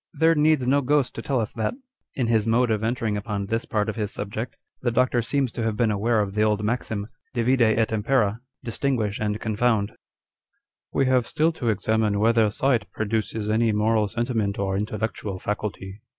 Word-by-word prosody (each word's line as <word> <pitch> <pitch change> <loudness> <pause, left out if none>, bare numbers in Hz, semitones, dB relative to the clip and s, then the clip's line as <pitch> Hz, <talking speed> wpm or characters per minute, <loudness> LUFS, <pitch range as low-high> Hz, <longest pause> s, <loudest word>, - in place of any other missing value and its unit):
" - - -57
There 165 +1 +5
needs 150 -3 +3
no 140 +2 +4
ghost 140 0 +1
to - - -6
tell 135 -3 0
us 110 - -3
that." 110 - -2 0.4
In 130 - 0
his 115 -2 +2
mode 120 +1 +3
of 110 0 0
entering 110 -2 0
upon 100 -1 -3
this 115 +3 -2
part 105 -1 0
of 110 - -2
his 105 -2 -2
subject, 110 +4 -5 0.3
the 125 - +1
Doctor 125 +1 +2
seems 135 +1 0
to 115 - -5
have 110 -2 -1
been 115 -2 +2
aware 110 +2 +2
of 100 -1 -3
the 105 - 0
old 105 -1 +2
maxim 110 -2 -2
â€" - - -13 0.3
Divide 125 +2 +2
et 110 -1 +3
impera 110 -1 +1
â€" - - -42 0.2
Distinguish 115 -4 -1
and 105 0 -1
confound! 110 -1 +1 0.5
" - - -54
We 135 - +2
have 130 -2 +2
still 160 +2 +2
to 120 -7 -2
examine 110 0 +1
whether 115 0 +4
sight 115 -1 0
produces 110 0 -2
any 110 +1 +2
moral 105 0 +2
sentiment 110 -2 -1
or 95 -1 -1
intellectual 105 -1 -3
faculty. 100 0 -4
110 Hz, 200 wpm, -24 LUFS, 105-120 Hz, 0.5 s, There